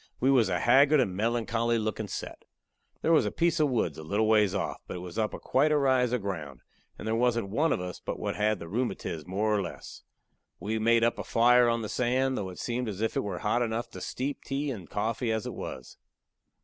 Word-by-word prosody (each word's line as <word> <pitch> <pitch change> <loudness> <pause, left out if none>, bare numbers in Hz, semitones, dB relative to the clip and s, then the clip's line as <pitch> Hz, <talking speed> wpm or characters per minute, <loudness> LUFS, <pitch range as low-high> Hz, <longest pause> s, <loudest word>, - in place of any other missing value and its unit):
We 130 +2 +3
was 120 -7 +4
a 90 - 0
haggard 140 +3 +5
and 95 -8 +1
melancholy 115 +2 0
lookin' 110 -1 -2
set. - - -7 0.6
There 165 - +2
was 160 - +4
a - - -2
piece 170 -1 +1
of 150 -2 +3
woods 100 - -1
a - - -7
little 105 +7 0
ways 105 -3 +3
off, - - -3
but - - -6
it - - -5
was 90 +4 -6
up 110 -1 0
quite 140 +4 +2
a 150 - +4
rise 130 -3 +2
of 125 -5 -1
ground, 75 -10 -5 0.4
and - - -7
there 110 - 0
wasn't 115 -3 +1
one 150 +11 +1
of - - +1
us 90 -1 -6
but - - -5
what - - -3
had 105 0 +1
the 85 - -9
rheumatiz 95 - -3
more 105 +4 0
or 100 - +1
less. 85 -4 -8 0.6
We 110 +2 -2
made 115 +1 +3
up 115 - +1
a - - -3
fire 120 +1 +4
on 115 -1 0
the - - -3
sand, 130 +3 +1
though 100 -6 -3
it 90 - -10
seemed 120 -1 -2
as 100 -2 -6
if 110 +1 -1
it - - +2
was 100 -3 -4
hot 115 +3 +1
enough 115 0 -2
to - - -9
steep 135 +2 -4
tea 140 +1 -2
and 95 - -8
coffee 115 +3 -1
as 110 -1 -1
it - - -4
was. 65 - -8
115 Hz, 240 wpm, -28 LUFS, 100-125 Hz, 0.6 s, haggard